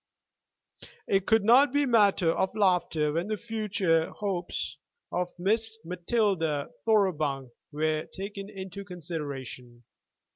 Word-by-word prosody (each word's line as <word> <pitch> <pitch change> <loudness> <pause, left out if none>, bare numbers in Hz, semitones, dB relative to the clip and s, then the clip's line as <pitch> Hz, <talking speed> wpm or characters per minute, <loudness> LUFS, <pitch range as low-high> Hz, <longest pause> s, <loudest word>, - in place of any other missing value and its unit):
It 195 -1 +1
could 220 -2 +4
not 245 +6 +6
be 285 +1 +2
matter 205 -8 +4
of 190 +4 -1
laughter 180 -7 +2
when 170 +4 -1
the 215 0 -1
future 200 -8 0
hopes 190 -4 -3 0.3
of 180 0 -1
Miss 220 +4 0
Matilda 175 -4 0 0.2
Thoroughbung 155 - +1 0.2
were 155 +1 -1
taken 200 +1 -7
into 195 -1 -7
consideration. 140 -9 -7
185 Hz, 110 wpm, -28 LUFS, 160-210 Hz, 0.3 s, not